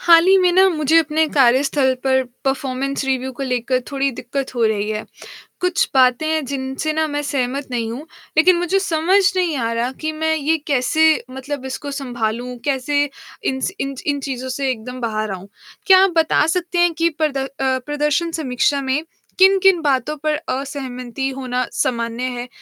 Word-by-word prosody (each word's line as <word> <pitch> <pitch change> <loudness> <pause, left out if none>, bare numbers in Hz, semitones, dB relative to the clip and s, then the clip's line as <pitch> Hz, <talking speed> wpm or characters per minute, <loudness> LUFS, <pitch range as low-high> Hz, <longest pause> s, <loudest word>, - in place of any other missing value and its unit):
हाल 335 0 +6
ही 385 - +7
में 365 -1 +4
ना 380 +2 +6
मुझे 315 -3 +1
अपने 315 0 +2
कार्यस्थल 265 0 +3
पर 260 -1 +3 0.2
परफॉर्मेंस 270 +1 -1
रिव्यू 265 -1 -1
को 265 - -7
लेकर 255 0 0
थोड़ी 275 -1 0
दिक्कत 265 +2 -5
हो 235 -2 +1
रही 210 -1 0
है, 215 0 -3 0.6
कुछ 360 -1 +1
बातें 255 +2 +4
हैं 315 -1 0
जिनसे 270 +3 -3
ना 315 0 +1
मैं 290 -1 -2
सहमत 275 0 -2
नहीं 230 -2 -2
हूँ, 275 +7 -7 0.3
लेकिन 355 +3 +6
मुझे 355 +3 +1
समझ 360 +1 +2 0.2
नहीं 355 -4 +1
आ 230 -2 -1
रहा 235 +2 -1
कि 310 - -1
मैं 315 +1 0
ये 315 +2 +1
कैसे 315 +4 +3
मतलब 265 +1 -6
इसको 285 +2 -5
सँभालूँ, 245 -2 -3
कैसे 285 +1 +1 0.4
इन 265 - -1
स - - -1
इन 275 0 -3
च - - -8
इन 285 -1 +1
चीज़ों 260 -2 -5
से 270 +1 -2
एकदम 250 +2 -7
बाहर 215 -2 -2
आऊँ? 190 0 -7 0.4
क्या 380 -1 +8
आप 390 - +4
बता 320 -2 +3
सकते 350 +1 -1
हैं 345 -1 +4
कि 330 +1 +1
प्रद 300 -3 +1
अ, 270 0 -2
प्रदर्शन 295 +5 0
समीक्षा 280 -2 0
में 270 +3 -1 0.4
किन-किन 385 -1 +6
बातों 290 0 0
पर 305 0 +1
असहमति 265 -1 -4
होना 255 -1 -2
सामान्य 235 -1 -1
है, 245 0 -5
275 Hz, 180 wpm, -20 LUFS, 255-315 Hz, 0.6 s, क्या